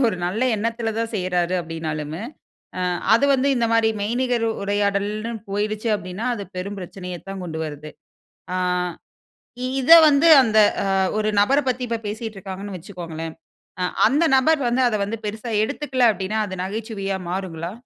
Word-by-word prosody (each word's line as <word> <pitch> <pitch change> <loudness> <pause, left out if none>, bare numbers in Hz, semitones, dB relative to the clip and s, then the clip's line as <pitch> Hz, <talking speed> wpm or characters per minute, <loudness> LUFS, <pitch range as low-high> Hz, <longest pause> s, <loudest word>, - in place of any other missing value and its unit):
ஒரு 205 - -2
நல்ல 215 +7 -1
எண்ணத்தில 230 +1 -2
தான் 230 0 -2
செய்றாரு 180 -2 0
அப்டின்னாலுமு 160 -1 -5 0.6
அ - - -2 0.3
அது 235 - +3
வந்து 270 +2 +1
இந்த 235 - +2
மாரி 230 -1 +4
மெய்நிகர் 240 +2 0 0.2
உரையாடல்னு 205 +2 -1 0.2
போயிடுச்சு 210 +2 -2
அப்டின்னா, 190 +1 -5
அது 205 - -6
பெரும் 200 +3 -4
பிரச்சனையத் 180 0 -8
தான் 195 -1 -5
கொண்டு 160 -2 -5
வருது. 150 0 -7 0.6
ஆ 185 - -1 1.3
இத 255 - -4 0.2
வந்து 295 +2 +4 0.2
அந்த 220 -2 +3 0.6
ஒரு 215 0 +1
நபர 275 +8 +3
பத்தி 255 0 0
இப்ப 230 0 -2
பேசிட்டுருக்காங்கன்னு 205 -2 -6
வச்சுக்கோங்களேன். 165 -3 -7 0.5
அ - - +1 0.2
அந்த 285 +8 +2
நபர் 295 +4 +3
வந்து 245 +2 +1
அத 220 - 0
வந்து 225 +3 -4
பெரிசா 220 +3 -4
எடுத்துக்கல 255 +1 +1
அப்டின்னா 210 +1 -3
அது 190 - -6
நகைச்சுவையா 200 -1 -3
மாறுங்களா? 175 -2 -4
205 Hz, 145 wpm, -22 LUFS, 185-230 Hz, 1.3 s, மாரி